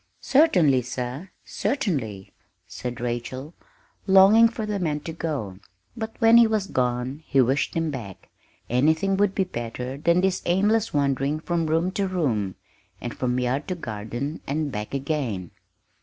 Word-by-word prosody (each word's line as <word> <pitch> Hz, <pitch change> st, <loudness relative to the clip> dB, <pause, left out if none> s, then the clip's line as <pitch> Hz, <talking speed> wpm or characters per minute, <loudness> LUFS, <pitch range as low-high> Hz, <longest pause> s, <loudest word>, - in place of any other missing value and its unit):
"Certainly, 180 Hz, -, +4 dB
sir, 125 Hz, +7 st, -5 dB, 0.2 s
certainly," 130 Hz, -, -2 dB, 0.3 s
said 125 Hz, -1 st, -6 dB
Rachel, 125 Hz, +5 st, -4 dB, 0.5 s
longing 195 Hz, +4 st, +7 dB
for 225 Hz, -1 st, -5 dB
the 210 Hz, -1 st, -2 dB
man 150 Hz, -4 st, -1 dB
to 165 Hz, -, -6 dB
go. 140 Hz, -, -4 dB, 0.4 s
But 220 Hz, 0 st, -5 dB
when 225 Hz, 0 st, +6 dB
he 235 Hz, -1 st, +7 dB
was 215 Hz, -3 st, 0 dB
gone, 125 Hz, -1 st, -1 dB
she 135 Hz, -, +3 dB
wished 130 Hz, +3 st, +2 dB
him 165 Hz, -2 st, 0 dB
back 110 Hz, -9 st, -8 dB, 0.4 s
anything 160 Hz, +10 st, +2 dB
would 200 Hz, -1 st, +2 dB
be 195 Hz, -, +2 dB
better 125 Hz, -4 st, -5 dB
than 170 Hz, +3 st, +3 dB
this 190 Hz, -1 st, +1 dB
aimless 210 Hz, +5 st, +2 dB
wandering 140 Hz, +1 st, 0 dB
from 165 Hz, 0 st, -1 dB
room 165 Hz, +4 st, +1 dB
to 195 Hz, 0 st, -1 dB
room, 120 Hz, -, -1 dB, 0.4 s
and -, -, -6 dB
from 125 Hz, 0 st, -1 dB
yard 125 Hz, +5 st, -1 dB
to 185 Hz, -, -2 dB
garden 120 Hz, +2 st, -5 dB
and 145 Hz, +1 st, -1 dB
back 105 Hz, +4 st, -5 dB
again. 130 Hz, -, -2 dB
150 Hz, 150 wpm, -24 LUFS, 125-190 Hz, 0.5 s, longing